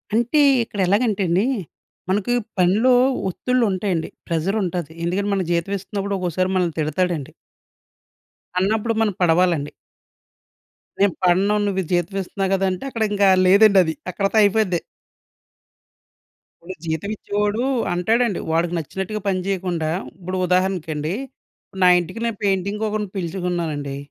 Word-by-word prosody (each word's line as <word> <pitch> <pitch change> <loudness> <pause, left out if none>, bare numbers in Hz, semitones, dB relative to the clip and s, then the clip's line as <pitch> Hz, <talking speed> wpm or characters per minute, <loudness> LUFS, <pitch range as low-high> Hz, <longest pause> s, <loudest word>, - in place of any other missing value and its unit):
అంటే, 240 +6 +3 0.2
ఇక్కడెలాగంటేండీ, 200 -1 +1 0.6
మనకి 205 +5 +1 0.2
పనిలో 205 +8 +4 0.4
ఒత్తిళ్లుంటాయండి, 195 -6 0 0.2
ప్రెజరుంటాది. 175 -1 -1
ఎందుకంటే, 195 +4 -1
మనకి 185 -3 -1
జీతం 170 +4 -1
ఇస్తన్నప్పుడు 200 +1 -3
ఒకోకసారి 185 +1 -1
మనల్ని 175 -4 0
తిడతాడండి. 155 -1 -1 1.3
అన్నప్పుడు 220 +4 +1
మనం 210 -3 +1
పడవాలండి. 170 -3 +2 1.3
నేను 200 -3 +3
పడను, 190 +4 +3
నువ్వీ 190 -2 0
జీతం 175 +2 0
ఇస్తున్నావు 195 +1 -3
గదంటే, 190 +1 -1
అక్కడింకా 210 -4 +1 0.2
లేదండది. 195 -4 +5 0.2
అక్కడితో 195 +4 -1
అయిపోయిద్ది. 200 -3 +2 1.8
ఇప్పుడు 185 +3 -8
జీతమిచ్చేవాడూ 205 +6 -2 0.3
అంటాడండి. 220 +4 +1
వాడికి 165 +1 +1
నచ్చినట్టుగా 190 +6 -4
పనిచేయకుండా 185 -4 -1 0.3
ఇప్పుడు 185 +1 -4
ఉదాహరణకండీ, 180 -4 0 0.7
నా 180 - +6
ఇంటికి 175 +6 -6
నేను 230 -3 -2
పెయింటింగ్‌కొకరిని 205 +2 -1
పిలుచుకున్నానండి, 170 -6 -3
190 Hz, 95 wpm, -21 LUFS, 175-205 Hz, 1.8 s, నా